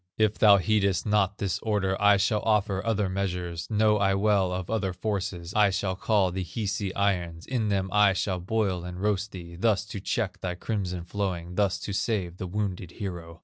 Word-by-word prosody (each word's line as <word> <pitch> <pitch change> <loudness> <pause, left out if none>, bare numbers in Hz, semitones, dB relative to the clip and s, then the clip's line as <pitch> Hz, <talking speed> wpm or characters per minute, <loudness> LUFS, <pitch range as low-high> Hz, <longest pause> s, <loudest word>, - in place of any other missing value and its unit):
If 110 -1 +2
thou 105 -2 +7
heedest 100 -1 +1
not 105 -2 +2
this 100 -3 -1
order, 100 -3 0
I 105 0 +6
shall 105 +2 +1
offer 105 -3 +1
other 110 -3 0
measures, 90 -3 -3
Know 105 -1 +3
I 95 -1 +2
well 100 -2 +2
of 90 0 -3
other 100 -4 -1
forces; 90 -3 -3
I 105 -1 +5
shall 95 -1 -1
call 100 -1 +2
the 95 +1 -3
Hisi 100 +1 -3
irons, 90 -5 -1
In 115 -5 -1
them 95 -1 0
I 105 -1 +5
shall 95 -1 -1
boil 95 -1 -1
and 90 0 -7
roast 105 0 0
thee, 85 -2 -9
Thus 105 +1 +1
to 105 - -6
check 105 0 -2
thy 90 -1 -3
crimson 90 -3 -3
flowing, 90 -2 -3
Thus 100 -1 +1
to 100 - -4
save 95 -4 -1
the 95 - -5
wounded 95 -3 -3
hero. 85 -5 -6
100 Hz, 190 wpm, -27 LUFS, 90-105 Hz, -, thou